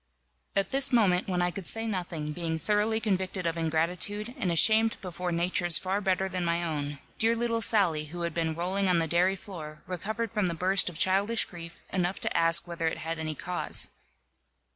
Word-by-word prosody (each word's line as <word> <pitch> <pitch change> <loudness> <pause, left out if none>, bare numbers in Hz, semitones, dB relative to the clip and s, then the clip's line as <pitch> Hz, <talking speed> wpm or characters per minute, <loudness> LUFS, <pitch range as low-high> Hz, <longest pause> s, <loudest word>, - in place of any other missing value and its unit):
At 195 -1 +1
this 275 +1 +3
moment, 195 -7 +3
when 180 -1 +1
I 175 - +1
could 190 -1 -7
say 225 0 +1
nothing, 175 -7 -3
being 165 0 -2
thoroughly 210 +6 +1
convicted 190 -3 -2
of 165 0 0
ingratitude, 175 +7 -1
and 195 -8 -1
ashamed 220 +6 +5
before 180 -2 -4
natures 175 0 +2
far 190 +3 -2
better 190 -1 +1
than 185 -1 -3
my 170 0 0
own, 145 -3 -3 0.2
dear 225 +1 +3
little 230 -1 -1
Sally, 180 -9 +2
who 170 +3 -6
had 170 -2 -2
been 160 -1 -1
rolling 190 +4 0
on 180 -2 +3
the 165 - +2
dairy 175 +4 +2
floor, 155 -6 -9
recovered 215 +6 -4
from 210 -4 0
the 170 - -1
burst 185 +3 +2
of 170 - -10
childish 195 +5 +2
grief 170 -1 -11
enough 180 0 0
to - - 0
ask 165 +1 +3
whether 170 -1 -2
it 160 - -2
had 165 +1 -4
any 155 -1 -3
cause. 180 +4 0
180 Hz, 195 wpm, -28 LUFS, 170-200 Hz, 0.2 s, ashamed